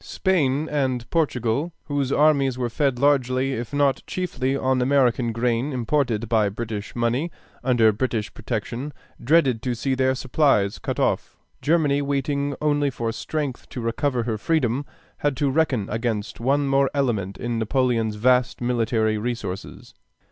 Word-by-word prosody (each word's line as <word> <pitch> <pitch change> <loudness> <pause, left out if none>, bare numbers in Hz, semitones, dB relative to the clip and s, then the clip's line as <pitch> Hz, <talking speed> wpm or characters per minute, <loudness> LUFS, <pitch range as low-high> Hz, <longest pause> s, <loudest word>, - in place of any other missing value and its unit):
Spain 155 -6 +1
and 130 -5 -1
Portugal, 145 -1 0
whose 140 -2 -1
armies 140 -4 +3
were 120 -2 -2
fed 135 0 +1
largely 135 -1 +2
if 120 -2 -4
not 145 -1 +2
chiefly 135 -7 -1
on 130 -1 +1
American 125 -3 +2
grain 120 +4 0
imported 125 -3 0
by 110 -2 +2
British 105 0 -5
money 120 +7 0 0.3
under 120 -4 +4
British 110 -1 -2
protection, 120 +5 -4 0.3
dreaded 130 -4 +3
to 125 -1 -2
see 135 +3 -1
their 130 0 +2
supplies 130 -6 +1
cut - - -3
off. - - 0 0.2
Germany, 150 -3 +2
waiting 140 0 -1
only 145 -1 +2
for 120 -3 -3
strength 140 +2 -4
to - - -6
recover 120 +2 -1
her 110 -2 -2
freedom, 140 -2 0 0.3
had 145 -2 -1
to 145 -2 +1
reckon 130 -9 +1
against 110 -2 -2
one 140 +4 +1
more 135 0 +3
element 105 -9 -1
in 120 -1 -2
Napoleon's 115 -2 +1
vast 125 +3 +2
military 115 -3 +1
resources. 105 -5 -5
130 Hz, 145 wpm, -23 LUFS, 115-140 Hz, 0.3 s, under